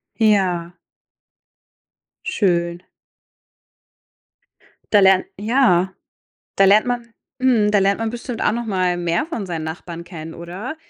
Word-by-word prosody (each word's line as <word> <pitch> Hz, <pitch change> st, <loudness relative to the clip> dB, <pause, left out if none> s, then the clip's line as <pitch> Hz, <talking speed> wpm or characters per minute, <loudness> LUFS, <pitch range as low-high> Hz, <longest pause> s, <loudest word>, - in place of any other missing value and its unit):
Ja. 185 Hz, -6 st, +1 dB, 1.5 s
Schön. 175 Hz, -3 st, 0 dB, 2.1 s
Da 205 Hz, -, +7 dB
lernt 190 Hz, -1 st, +5 dB
ja. 205 Hz, -5 st, +2 dB, 0.6 s
Da 195 Hz, -, +5 dB
lernt 205 Hz, +4 st, +5 dB
man 240 Hz, -1 st, -2 dB, 0.3 s
mhm, 240 Hz, -5 st, +3 dB
da 210 Hz, -, +3 dB
lernt 195 Hz, 0 st, +2 dB
man 225 Hz, -1 st, -1 dB
bestimmt 240 Hz, 0 st, -6 dB
auch -, -, +2 dB
noch 235 Hz, +1 st, -3 dB
mal 185 Hz, -4 st, 0 dB
mehr 175 Hz, -, -1 dB
von 235 Hz, -, -5 dB
seinen 165 Hz, -3 st, -4 dB
Nachbarn 170 Hz, +1 st, -7 dB
kennen, 165 Hz, -2 st, -9 dB
oder? 185 Hz, -, -7 dB
195 Hz, 120 wpm, -20 LUFS, 175-225 Hz, 2.1 s, Da